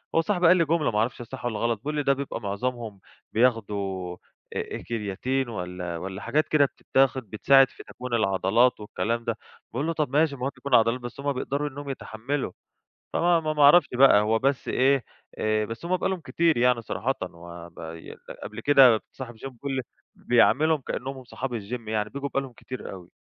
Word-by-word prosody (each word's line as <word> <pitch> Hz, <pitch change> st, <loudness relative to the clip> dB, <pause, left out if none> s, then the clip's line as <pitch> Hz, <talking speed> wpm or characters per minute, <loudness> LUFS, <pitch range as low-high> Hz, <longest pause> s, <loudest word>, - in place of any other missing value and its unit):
هو 165 Hz, -, +5 dB
صاحبي 180 Hz, -1 st, +2 dB
قال 180 Hz, +2 st, +7 dB
لي 165 Hz, -, +3 dB
جملة، 155 Hz, -2 st, +1 dB
ما 105 Hz, -, 0 dB
أعرفش 120 Hz, +3 st, -1 dB
هي -, -, -7 dB
صح 130 Hz, +1 st, -8 dB
والّا 110 Hz, -3 st, -2 dB
غلط، 115 Hz, 0 st, +1 dB
بيقول 150 Hz, +6 st, -4 dB
لي: 150 Hz, -, 0 dB
"ده 140 Hz, -, +4 dB
بيبقى 135 Hz, -3 st, -5 dB
معظمهم 110 Hz, +1 st, -4 dB, 0.3 s
بياخُدوا 100 Hz, -6 st, 0 dB, 0.4 s
أ -, -, -3 dB
أ -, -, -6 dB
كرياتين 120 Hz, +4 st, -2 dB
والّا 90 Hz, -4 st, -5 dB
والّا 95 Hz, +3 st, -6 dB
حاجات 145 Hz, +9 st, +1 dB
كده 150 Hz, -2 st, +4 dB
بتتاخَد، 135 Hz, -1 st, +1 dB
بتساعِد 135 Hz, +5 st, +5 dB
في -, -, -13 dB
تكوين 125 Hz, -1 st, -8 dB
العضلات 110 Hz, +3 st, +2 dB
والكلام 115 Hz, +2 st, -2 dB
ده." 115 Hz, -2 st, -1 dB, 0.4 s
باقول 135 Hz, +6 st, -1 dB
له: 165 Hz, -, 0 dB
"طب 155 Hz, -4 st, -1 dB
ماشي 145 Hz, +1 st, +2 dB
المهم 130 Hz, +1 st, -3 dB
يكون 130 Hz, +1 st, +1 dB
عضلات، 115 Hz, +2 st, +4 dB
بس 120 Hz, +2 st, -8 dB
هُم 140 Hz, 0 st, -1 dB
بيقدَروا 140 Hz, +3 st, -2 dB
إنَّهُم 140 Hz, +1 st, -8 dB
يتحمَّلوا." 135 Hz, +2 st, -4 dB, 0.6 s
فما 170 Hz, 0 st, +3 dB
ما 155 Hz, -2 st, 0 dB
أعرَفش 150 Hz, +5 st, +8 dB
بقى، 125 Hz, -4 st, +6 dB
هو 110 Hz, +2 st, +2 dB
بس 135 Hz, +2 st, 0 dB
إيه، 135 Hz, -1 st, +3 dB, 0.3 s
آآ، 110 Hz, 0 st, +1 dB
بس 115 Hz, +7 st, -7 dB
هُم 185 Hz, +1 st, +2 dB
بقى -, -, -1 dB
لهم 190 Hz, -2 st, -2 dB
كتير 165 Hz, +1 st, +1 dB
يعني 125 Hz, 0 st, +3 dB
صراحةً، 125 Hz, +3 st, -2 dB, 0.2 s
وب 85 Hz, 0 st, -11 dB
ي 80 Hz, 0 st, -9 dB, 0.3 s
قبل -, -, -7 dB
كده 130 Hz, -6 st, +6 dB
صاحب 125 Hz, -3 st, -8 dB
الgym، -, -, -21 dB
بيقل 135 Hz, +2 st, -5 dB
لي 130 Hz, -, -1 dB, 0.3 s
بيعاملهم 150 Hz, +6 st, +3 dB
كأنَّهُم 135 Hz, +1 st, -5 dB
هُم 130 Hz, -, -11 dB
صحاب 130 Hz, +2 st, -5 dB
الgym، 115 Hz, +2 st, -6 dB
يعني 105 Hz, -1 st, -1 dB
بييجوا 140 Hz, 0 st, -4 dB
بقى 135 Hz, -, 0 dB
لهم 135 Hz, -2 st, -8 dB
كتير 130 Hz, +1 st, -8 dB
أوي. 90 Hz, -2 st, -11 dB
125 Hz, 200 wpm, -26 LUFS, 110-140 Hz, 0.6 s, أعرَفش